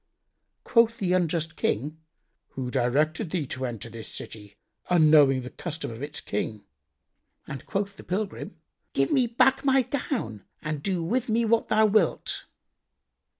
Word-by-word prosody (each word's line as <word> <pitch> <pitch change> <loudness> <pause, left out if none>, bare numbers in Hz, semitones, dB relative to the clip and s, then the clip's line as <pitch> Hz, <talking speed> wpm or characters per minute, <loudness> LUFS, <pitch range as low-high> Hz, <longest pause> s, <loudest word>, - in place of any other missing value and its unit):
Quoth 230 -1 +4
the 180 -2 0
unjust 170 -3 0
King, 150 +8 -1 0.5
"Who 125 -2 -4
directed 145 +6 +1
thee 165 -3 -1
to 130 0 -3
enter 115 -2 -6
this 115 -1 -9
city, 105 -1 -8 0.3
unknowing 150 -6 +6
the 125 - -7
custom 165 -7 -5
of 115 +2 -8
its 145 +1 -4
King?"; 105 +1 -3 0.8
and 140 - -7
quoth 200 0 -2
the - - -10
pilgrim, 195 +3 -3 0.4
"Give - - +1
me 260 -5 +4
back 250 +3 +3
my 270 -1 +4
gown 235 - -3 0.2
and 155 -1 -4
do 185 -2 -1
with 240 +8 0
me 230 +1 +2
what 225 +1 +2
thou 220 0 +4
wilt." 215 0 +1
160 Hz, 150 wpm, -27 LUFS, 130-215 Hz, 0.8 s, unknowing